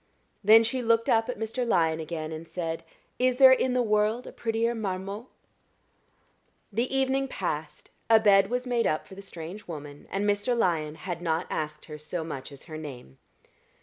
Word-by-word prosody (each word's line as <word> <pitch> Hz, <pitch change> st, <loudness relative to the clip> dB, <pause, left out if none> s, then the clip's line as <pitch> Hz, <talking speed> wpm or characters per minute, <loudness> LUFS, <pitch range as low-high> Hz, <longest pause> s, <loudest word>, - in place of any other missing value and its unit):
Then 220 Hz, +3 st, +8 dB
she 250 Hz, +3 st, -1 dB
looked 230 Hz, -1 st, +2 dB
up 225 Hz, +1 st, +3 dB
at 250 Hz, -, -3 dB
Mr. 225 Hz, +3 st, -2 dB
Lyon 165 Hz, -8 st, +2 dB
again 160 Hz, 0 st, -4 dB
and 160 Hz, +1 st, -7 dB
said, 165 Hz, -2 st, -4 dB, 0.4 s
"Is 255 Hz, 0 st, +2 dB
there 265 Hz, -1 st, +9 dB
in 260 Hz, -1 st, +3 dB
the 250 Hz, -, +3 dB
world 215 Hz, +2 st, +1 dB
a -, -, -8 dB
prettier 230 Hz, +1 st, -1 dB
marmot?" 200 Hz, +1 st, -4 dB, 1.5 s
The 235 Hz, +5 st, 0 dB
evening 270 Hz, 0 st, +1 dB
passed; -, -, -4 dB, 0.2 s
a 225 Hz, -1 st, +7 dB
bed 195 Hz, -2 st, +5 dB
was 250 Hz, +1 st, -1 dB
made 240 Hz, -2 st, +1 dB
up 155 Hz, -, -1 dB
for -, -, -12 dB
the 195 Hz, -, -9 dB
strange 185 Hz, +1 st, -8 dB
woman, 145 Hz, -3 st, -8 dB
and 200 Hz, +1 st, -1 dB
Mr. 205 Hz, +4 st, +1 dB
Lyon 160 Hz, -7 st, +1 dB
had 175 Hz, 0 st, -5 dB
not 165 Hz, 0 st, 0 dB
asked 150 Hz, 0 st, -4 dB
her 150 Hz, -1 st, -9 dB
so 160 Hz, +3 st, -4 dB
much 145 Hz, -3 st, -6 dB
as 140 Hz, -, -12 dB
her 155 Hz, -2 st, -8 dB
name. 125 Hz, -, -9 dB
200 Hz, 180 wpm, -27 LUFS, 160-235 Hz, 1.5 s, there